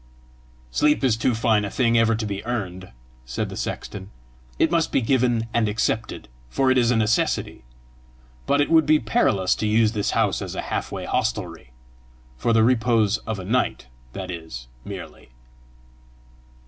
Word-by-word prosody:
"Sleep 150 - +2
is 125 -4 +3
too 115 +1 0
fine 110 -2 +2
a 100 - -3
thing 115 +1 +1
ever 115 0 +4
to 110 0 -3
be 100 -1 -4
earned," 95 -6 -4 0.3
said 60 -1 -4
the - - -7
sexton; 95 0 -5 0.5
"it 160 - +2
must 165 -2 +1
be - - +3
given 120 -2 +1
and 115 -2 +2
accepted, 110 - -2 0.2
for 130 - +2
it 130 - +3
is 120 -1 +2
a 125 - +3
necessity. 110 - 0 0.8
But 140 +1 +3
it 145 - 0
would 160 -2 +5
be 155 0 +6
perilous 105 -5 +2
to 110 - -1
use 110 0 +3
this 105 -3 -1
house - - +1
as - - -5
a - - -2
half - - -2
way - - -5
hostelry 60 - -2 0.7
for 90 - 0
the 115 -1 +4
repose 115 -3 +3
of 110 -2 -2
a 95 - -7
night, 120 - -1 0.2
that 95 -1 -5
is, 80 -8 -8 0.2
merely." - - -9
110 Hz, 170 wpm, -23 LUFS, 100-125 Hz, 0.8 s, be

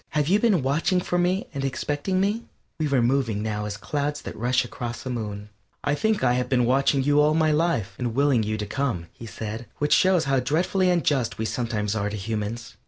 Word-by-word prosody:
"Have 150 -1 +2
you 200 +5 +4
been 210 - +3
watching 155 +7 +1
for 175 0 -1
me 180 +2 +1
and 140 -2 -3
expecting 145 +7 -1
me?" 205 +4 +1 0.4
We 155 - +1
were 135 -4 +2
moving 120 -4 +1
now 105 -1 -2
as 105 -1 -4
clouds 145 +5 -3
that - - -7
rush 125 +2 +1
across 120 0 -6
a 130 - -3
moon. 105 -3 -5 0.3
"I 145 - +1
think 220 +5 0
I 120 -1 +4
have 125 0 -1
been 125 -2 +3
watching 135 +2 +2
for - - -5
you 145 0 +5
all 150 +1 +3
my 160 -1 +3
life 150 - +1
and 120 -2 -2
willing 140 -3 +3
you 110 0 -2
to 105 - -3
come," 115 -6 -2
he 115 - -10
said, 110 +2 -6
which 145 0 +2
shows 185 -3 +4
how 135 -1 +2
dreadfully 180 +7 +1
unjust 145 -9 +1
we 110 - -2
sometimes 110 -3 -2
are 105 -1 -1
to 105 - -5
humans. 110 +2 -4
130 Hz, 225 wpm, -25 LUFS, 110-155 Hz, 0.4 s, you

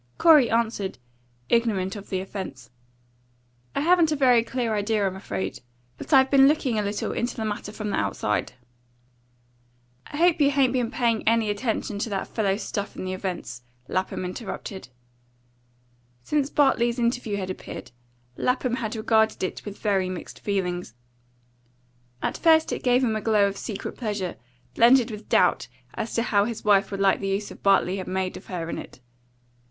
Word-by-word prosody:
Corey 305 -7 +6
answered, 225 -4 -1 0.5
ignorant 215 -5 +1
of 205 -1 -9
the 185 -1 -1
offence: 190 - -7 1.0
"I - - +1
haven't 335 0 +4
a - - +2
very 250 -5 +4
clear 235 -2 -2
idea, 210 0 0
I'm 190 -1 -1
afraid; 95 - -4 0.4
but - - -8
I've 265 -2 +5
been 270 -1 +7
looking 275 -7 +1
a - - +1
little 205 0 -2
into 240 - -2
the 220 - -3
matter 210 -1 -4
from 210 -1 -4
the - - 0
outside." 100 +1 -1 1.5
"I 290 - -7
hope 340 -1 +3
you 280 - +5
hain't 270 -3 +2
been 245 -3 0
paying 235 -3 +1
any 225 -2 +3
attention 210 -1 -2
to 225 - -2
that 195 -2 -3
fellow's 205 -2 -1
stuff 200 0 -4
in - - -5
the 185 - -3
Events?" 185 -9 -5 0.3
Lapham 185 0 -2
interrupted. 190 - -6 1.3
Since 290 - 0
Bartley's 240 -5 +2
interview 235 -3 -1
had 190 -1 -3
appeared, 125 -8 -8 0.5
Lapham 250 -1 0
had 225 -2 -3
regarded 220 -1 +2
it 185 - -3
with 205 -1 -7
very 195 -3 0
mixed 185 -1 -7
feelings. 180 - -2 1.3
At - - -2
first 320 -1 +4
it - - -4
gave 250 +1 +3
him 225 -3 +1
a 215 - -2
glow 210 -2 +3
of 200 - -4
secret 200 0 -6
pleasure, 205 -6 -3 0.4
blended 240 0 +5
with 210 0 -9
doubt - - +3 0.3
as 225 0 -4
to 230 - +2
how 205 -4 +2
his 225 -1 -5
wife 200 -1 +4
would 195 - -5
like 195 -1 +3
the 195 - -3
use 195 +1 -2
Bartley 195 -1 +2
had 190 - -5
made 185 0 -2
of 185 - -11
her 175 -3 -4
in - - -4
it. - - -11
215 Hz, 170 wpm, -25 LUFS, 195-240 Hz, 1.5 s, been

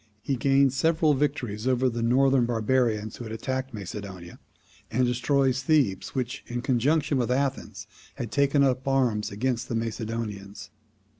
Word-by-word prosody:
He 135 - 0
gains 135 +1 +3
several 160 +1 +3
victories 130 -6 -2
over 130 0 +2
the 120 -1 -2
northern 130 +1 +3
barbarians 115 -2 0
who - - -7
had 110 - -7
attacked 130 +3 -3
Macedonia, 100 -4 -8 0.5
and 125 +3 +1
destroys 130 +1 +1
Thebes, 130 -10 +1
which, 125 -1 -3
in 120 0 -4
conjunction 135 +3 +1
with 120 - 0
Athens, 135 +1 -2 0.3
had 120 - -5
taken 140 0 +3
up 130 0 0
arms 125 -6 +1
against 125 +4 -2
the 115 - -2
Macedonians. 110 -3 -4
125 Hz, 145 wpm, -26 LUFS, 110-135 Hz, 0.5 s, gains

